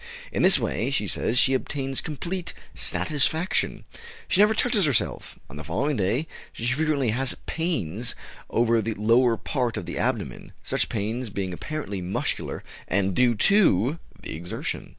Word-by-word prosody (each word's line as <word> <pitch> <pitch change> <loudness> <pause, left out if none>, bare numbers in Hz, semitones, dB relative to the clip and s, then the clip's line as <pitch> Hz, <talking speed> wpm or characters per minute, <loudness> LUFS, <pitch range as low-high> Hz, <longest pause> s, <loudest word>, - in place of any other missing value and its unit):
In - - -1
this - - +7
way, - - -1
she - - +1
says, 120 - 0
she 135 - +5
obtains 135 0 -1
complete 170 +4 -4 0.2
satisfaction. 160 +4 0 0.4
She 195 - +4
never 215 +1 +5
touches 220 -5 +2
herself. 135 -7 -1
On 65 - -10
the 75 - -6
following 140 - 0
day 110 +8 0 0.3
she 115 - -5
frequently 140 -1 +1
has 130 +3 0
pains 120 - -2 0.3
over 115 -1 +3
the 110 0 -2
lower 115 +2 +4
part 125 -3 -1
of - - -4
the - - -5
abdomen, - - -2
such - - -1
pains 115 +3 -2
being 95 -2 -3
apparently 105 - -4
muscular 90 +2 -2 0.2
and 95 0 +1
due 125 -2 +4
to 150 - +4 0.2
the - - -6
exertion. 85 +2 -4
125 Hz, 150 wpm, -25 LUFS, 105-155 Hz, 0.4 s, this